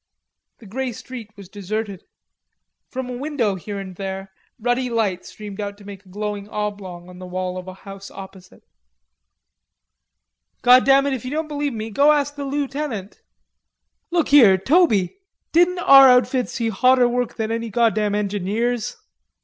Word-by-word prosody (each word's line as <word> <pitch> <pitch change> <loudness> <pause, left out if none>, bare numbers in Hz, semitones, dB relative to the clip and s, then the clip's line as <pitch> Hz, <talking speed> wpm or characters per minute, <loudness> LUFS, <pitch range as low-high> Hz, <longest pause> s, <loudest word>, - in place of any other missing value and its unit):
The 230 - -16
grey 250 +5 -4
street 235 -1 -9
was 200 -2 -11
deserted. 205 0 -5 0.8
From 260 -1 -5
a 250 - -5
window 260 -6 -1
here 200 +2 -6
and 190 -2 -7
there 195 0 -6 0.2
ruddy 245 +2 0
light 215 -6 -1
streamed 210 -1 -8
out 200 0 -5
to 205 - -16
make 200 -1 -10
a 190 - -20
glowing 205 +1 -5
oblong 200 -5 -5
on 180 0 -12
the 185 - -8
wall 185 0 -3
of 185 0 -7
a 185 - -8
house 195 0 -9
opposite. 190 -1 -12 2.0
"Goddam 270 +2 +6
it, 280 - 0
if 260 - -4
ye 255 - -5
don't 310 +3 -2
believe 290 -2 -2
me, 220 -1 -4
you 225 - -8
go 285 +8 +5
ask 290 -1 0
the 285 -1 -5
lootenant.... 275 -7 -4 0.9
Look 345 -2 0
here, 230 -10 +7
Toby, 260 - +2 0.3
didn't 350 +2 +3
our 275 -6 +8
outfit 250 0 +3
see 230 -1 -2
hotter 250 +3 +4
work 245 0 -2
than 220 -1 -3
any 230 0 -3
goddam 215 -2 +1
engineers?" 210 - -2
220 Hz, 160 wpm, -21 LUFS, 195-260 Hz, 2.0 s, our